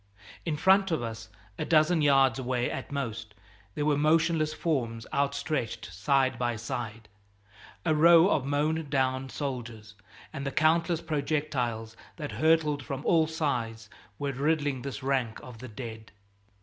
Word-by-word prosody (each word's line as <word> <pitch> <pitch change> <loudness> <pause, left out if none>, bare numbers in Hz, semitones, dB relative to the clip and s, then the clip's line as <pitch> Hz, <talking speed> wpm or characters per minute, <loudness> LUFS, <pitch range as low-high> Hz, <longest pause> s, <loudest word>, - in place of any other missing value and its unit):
In 155 -2 0
front 195 +4 +4
of 160 -8 -1
us, 115 -1 -6 0.3
a - - 0
dozen 160 +1 +3
yards 135 -3 +4
away 125 -1 -1
at - - -6
most, 115 -6 -4 0.4
there 145 - -1
were 145 -1 +2
motionless 155 0 +2
forms 120 -9 -2
outstretched 140 - -2
side 130 - +1
by 120 -1 0
side 110 -1 -5 0.8
a 155 - +3
row 165 +3 +7
of 140 - +2
mown 150 +2 0
down 130 -1 0
soldiers 120 -7 -5 0.4
and 140 - -5
the 135 - -1
countless 165 +3 +2
projectiles 140 -7 -2 0.2
that 150 -4 -6
hurtled 155 -3 +2
from 135 +2 -5
all 160 -2 +4
sides 120 -9 -3 0.3
were 140 -1 -2
riddling 145 -1 0
this 135 -1 -6
rank 130 -5 0
of 125 -3 -11
the 130 - -8
dead! 110 -1 -8
140 Hz, 145 wpm, -28 LUFS, 120-155 Hz, 0.8 s, row